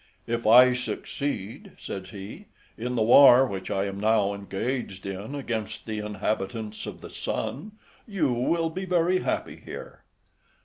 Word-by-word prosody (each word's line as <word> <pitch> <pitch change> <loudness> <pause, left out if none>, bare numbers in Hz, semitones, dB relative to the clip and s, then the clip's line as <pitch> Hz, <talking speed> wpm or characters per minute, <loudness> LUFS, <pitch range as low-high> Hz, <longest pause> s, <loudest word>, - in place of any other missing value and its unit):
"If 115 -1 -2
I 125 +3 +8
succeed," 125 -3 -4
says 95 -1 -7
he, 105 - -9 0.3
"in 125 +2 -3
the 115 - +2
war 130 +2 +8
which 95 -6 -5
I 95 0 0
am 100 0 -5
now 105 -1 +2
engaged 100 +1 -4
in 100 +7 -5
against 115 -6 -4
the 110 -1 -4
inhabitants 105 +1 -3
of - - -8
the - - -9
sun, 205 +10 -4 0.3
you 170 - 0
will 165 +7 0
be 190 +3 -4
very 180 0 +2
happy - - -2
here." - - -9
115 Hz, 145 wpm, -26 LUFS, 100-140 Hz, 0.3 s, I